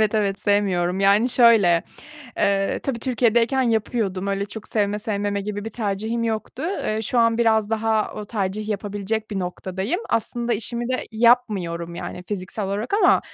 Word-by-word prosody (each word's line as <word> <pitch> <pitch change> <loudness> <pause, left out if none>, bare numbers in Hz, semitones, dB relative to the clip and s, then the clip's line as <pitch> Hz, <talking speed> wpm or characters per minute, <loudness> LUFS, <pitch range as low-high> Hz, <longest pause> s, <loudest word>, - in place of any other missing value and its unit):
Evet, 215 0 +2
evet 200 -2 +1
sevmiyorum. 190 -3 +1
Yani 200 +5 +4
şöyle, 220 -9 +5 0.5
eee, 195 -1 +1
tabii 265 -4 -2
Türkiye'deyken 240 +1 +2
yapıyordum. 220 -4 -1
Öyle 200 0 -1
çok 210 +1 -9
sevme, 210 -1 0
sevmeme 205 -2 -2
gibi 205 +1 -5
bir 225 - -5
tercihim 220 +1 -2
yoktu. 225 +4 -3 0.2
Eee, 215 +1 -1
şu 240 +3 -1
an 230 0 +3
biraz 220 -2 +2
daha 220 -1 0
o 210 - -5
tercih 210 0 -3
yapabilecek 205 +1 -3
bir 200 - -2
noktadayım. 190 - -3
Aslında 235 +1 -1
işimi 235 +2 -3
de 255 0 -2
yapmıyorum 205 -8 +2
yani 180 +1 -6
fiziksel 195 +1 -4
olarak 205 - -2
ama, 425 - +5
215 Hz, 155 wpm, -23 LUFS, 200-230 Hz, 0.5 s, şöyle